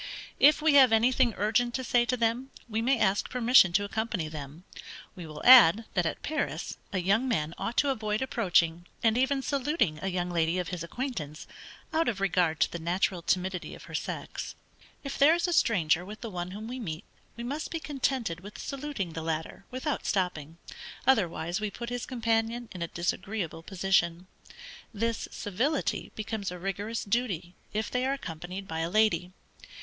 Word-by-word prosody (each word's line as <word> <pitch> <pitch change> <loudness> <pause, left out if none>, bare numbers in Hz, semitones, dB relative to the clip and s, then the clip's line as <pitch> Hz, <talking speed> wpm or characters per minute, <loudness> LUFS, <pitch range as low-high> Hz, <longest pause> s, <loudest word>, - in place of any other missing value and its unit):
If 300 +2 +6
we 315 -2 +5
have 265 -4 +8
anything 240 +1 +3
urgent 240 +3 +1
to 260 - -2
say 240 0 +3
to 250 +2 0
them, 235 +3 0 0.2
we 225 -1 -1
may 260 +3 +3
ask 205 -2 +1
permission 245 -6 +5
to 205 - +3
accompany 210 -4 -2
them. 150 +1 -8 0.5
We 175 -3 -8
will 150 -1 -9
add, 230 -4 +9
that 175 -3 +1
at - - -5
Paris, 310 +1 -3
a 195 - -1
young 200 +8 +2
man 160 -10 0
ought 235 - -3
to 285 - +4
avoid 215 -1 -1
approaching, 175 -8 +1 0.2
and 225 -1 +4
even 265 +2 +1
saluting 275 - 0
a 195 - -2
young 180 -1 -1
lady 165 0 +1
of 180 -2 -2
his 180 -3 -4
acquaintance, 170 - -5 0.5
out 320 -2 +2
of 210 -5 -3
regard 175 -4 +1
to - - +3
the 170 - -5
natural 175 +2 0
timidity 185 +1 -1
of - - -13
her - - -12
sex. - - -4 0.5
If 275 - -5
there 300 +4 +7
is 345 +1 0
a 350 - 0
stranger 175 - +3
with 210 +4 -9
the 230 -2 -5
one 175 -1 -4
whom 210 +4 -7
we 255 +2 -5
meet, 160 -9 -5 0.3
we 235 - -5
must 285 +6 -3
be 330 - -3
contented 265 - -2
with 205 +3 -11
saluting 275 - -4
the 160 - -4
latter 160 +4 -4
without 260 +3 -3
stopping, 170 -5 -1 0.5
otherwise 175 -7 +1
we 210 - -1
put 235 +3 -7
his 245 -1 -3
companion 230 -1 -1
in 180 - -8
a 170 - -1
disagreeable 175 0 -3
position. 185 -1 +1 0.7
This 230 +1 -2
civility 250 - -1
becomes 215 -2 -3
a 180 - -6
rigorous 200 +5 -3
duty 200 -6 -1 0.2
if 215 0 -2
they 250 0 0
are 270 - +1
accompanied 180 - -6
by 160 0 -4
a 165 +1 -1
lady. 215 -3 +2
210 Hz, 185 wpm, -29 LUFS, 175-245 Hz, 0.7 s, add